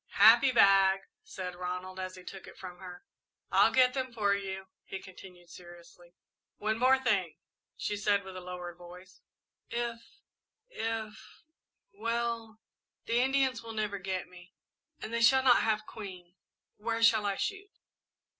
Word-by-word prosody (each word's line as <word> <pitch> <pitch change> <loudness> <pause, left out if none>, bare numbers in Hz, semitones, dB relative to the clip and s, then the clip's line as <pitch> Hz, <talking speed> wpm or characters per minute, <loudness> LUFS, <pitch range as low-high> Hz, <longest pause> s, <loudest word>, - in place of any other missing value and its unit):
"Happy 235 +6 +8
bag," 195 -4 +5 0.2
said 180 -1 -6
Ronald, 180 +1 -5
as 185 0 -5
he 185 - -12
took 190 +1 -10
it - - -13
from 180 -2 -9
her. 180 -1 -10 0.5
"I'll - - +5
get 255 -1 +4
them 260 -1 -3
for 210 -4 +1
you," 190 -1 -4 0.2
he 195 - -7
continued, 180 -2 -14
seriously. 175 0 -14 0.4
"One 215 +1 -1 0.2
thing 210 -6 +3
more," 170 - -12 0.5
she 205 - -2
said, 205 0 +1
with 190 0 -10
lowered 180 -1 -7
voice. 180 +2 -13 0.5
"If 235 -1 -3 0.7
if 225 - -5 0.5
well, 230 - -3 0.5
the 235 +1 +1
Indians 265 -2 +1
will 230 -1 -8
never 210 -2 -2
get 190 -1 -3
me. 180 +1 -16 0.4
And 220 - -7
they 230 - 0
shall 265 +3 +6
not 250 -2 +6
have 215 -1 0
Queen. 185 -6 -9 0.4
Where 230 +2 -2
shall 220 -2 +5
I 200 - 0
shoot?" 405 - -4
200 Hz, 145 wpm, -31 LUFS, 185-230 Hz, 0.7 s, Happy